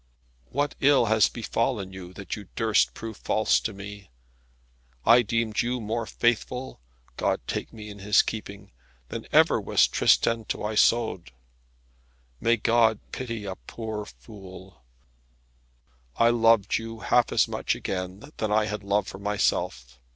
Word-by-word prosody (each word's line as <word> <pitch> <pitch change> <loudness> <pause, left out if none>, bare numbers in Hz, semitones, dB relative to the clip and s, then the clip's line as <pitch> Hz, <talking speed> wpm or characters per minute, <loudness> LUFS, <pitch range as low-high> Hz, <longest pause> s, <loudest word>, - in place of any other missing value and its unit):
What 145 +2 -1
ill 140 -3 +5
has 110 -1 +4
befallen 115 -4 -2
you, 90 -2 -9
that 100 0 -6
you 105 -3 -10
durst 110 -2 +2
prove 110 -2 -7
false 110 0 +2
to 110 - -3
me? 100 -1 -10 1.0
I 115 +3 +7
deemed 115 -1 0
you 125 +1 -2
more 115 +1 -3
faithful 120 - -1 0.4
God - - 0
take - - -4
me 105 -1 -10
in 100 - -11
His 105 +1 +4
keeping 100 -2 -7 0.4
than - - -6
ever - - +4
was - - +4
Tristan 115 -1 +2
to - - -4
Isoude. 110 - +2 1.1
May 120 +1 +2
God 115 0 +3
pity 115 -5 -5
a 95 -1 -4
poor 110 -2 -6
fool, 95 - -13 1.3
I 115 0 +4
loved 115 -3 +3
you 115 0 -8
half 120 -1 +2
as - - +3
much - - -1
again 95 +9 -5
than 110 -1 -2
I 105 0 +3
had 105 -1 -4
love 100 0 0
for 95 - -8
myself. 65 -11 -1
110 Hz, 145 wpm, -26 LUFS, 100-115 Hz, 1.3 s, I